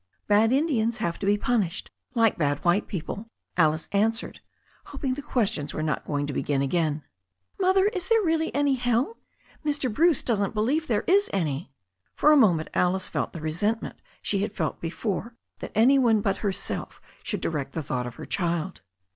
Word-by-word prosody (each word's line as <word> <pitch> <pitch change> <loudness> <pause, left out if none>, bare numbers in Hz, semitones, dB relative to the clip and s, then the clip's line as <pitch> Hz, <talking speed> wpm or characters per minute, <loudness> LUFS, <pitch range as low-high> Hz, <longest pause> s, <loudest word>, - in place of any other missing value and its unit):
"Bad 210 +2 +4
Indians 255 -5 +1
have 170 -6 -2
to 195 - -2
be 205 +1 +4
punished, 205 -7 -1 0.2
like 225 -2 +4
bad 145 -1 -1
white 175 +4 +3
people," 200 +4 -5 0.3
Alice 155 -2 +2
answered, 225 +4 0 0.5
hoping 275 -2 -3
the 285 - -5
questions 210 - -1
were 155 - -2
not 155 -1 -1
going 145 -1 -1
to 145 - -4
be - - -1
gin 140 -2 0
again. 155 0 0 0.6
"Mother, 380 0 +4
is 380 -3 -1
there 450 0 +3
really 320 -2 +1
any 285 -1 +3
hell? 245 - 0 0.5
Mr. 285 -6 -1
Bruce 325 +3 +3
doesn't 210 -3 0
be 210 - +1
lieve 300 +8 +1
there 215 -4 +1
is 400 +3 +3
any." 155 -6 -2 0.4
For 300 - +5
a - - +7
moment 180 - +4
Alice 185 +1 +1
felt - - -2
the 165 - -8
resentment 205 +9 -1 0.3
she 200 - 0
had 205 +1 -2
felt 165 -7 -3
before 205 +6 -3 0.2
that - - -7
any 255 +6 +5
one 225 -4 +4
but 195 -1 0
herself 200 -2 -3 0.2
should - - -3
direct 150 -4 -2
the 160 - -3
thought 125 -2 -2
of 120 - -8
her - - -8
child. 175 0 -2
210 Hz, 185 wpm, -26 LUFS, 165-260 Hz, 0.6 s, a